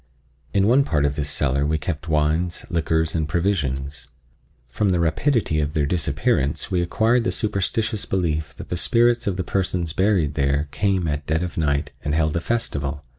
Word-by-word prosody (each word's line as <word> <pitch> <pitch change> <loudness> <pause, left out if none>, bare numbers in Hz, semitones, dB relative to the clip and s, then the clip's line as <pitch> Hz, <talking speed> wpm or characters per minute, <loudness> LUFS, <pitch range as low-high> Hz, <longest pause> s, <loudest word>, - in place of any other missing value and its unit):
In 100 -1 +2
one 125 +6 +5
part 75 - +1
of 70 0 0
this 70 -1 -2
cellar 70 -1 0
we 80 +2 +1
kept 75 +1 -4
wines, 80 +3 0
liquors 80 -1 0
and 80 -2 -1
provisions. 70 -6 -1 0.6
From 100 - 0
the 90 -2 +2
rapidity 85 - +1
of 75 0 -2
their 75 -2 +1
disappearance 80 - 0
we 90 -2 +2
acquired 115 +7 +2
the - - 0
superstitious 110 +1 -1
belief 80 -5 -1
that - - -10
the 90 - -2
spirits 120 +3 +3
of 95 -2 0
the 95 - -1
persons 90 -4 -1
buried 95 -6 +2
there 70 +1 0
came 95 -4 0
at 75 -1 -3
dead 80 +2 0
of 90 - -5
night 70 -3 0
and 75 +1 -1
held 80 -1 +1
a 85 - 0
festival. 75 -11 -2
80 Hz, 180 wpm, -22 LUFS, 75-95 Hz, 0.6 s, one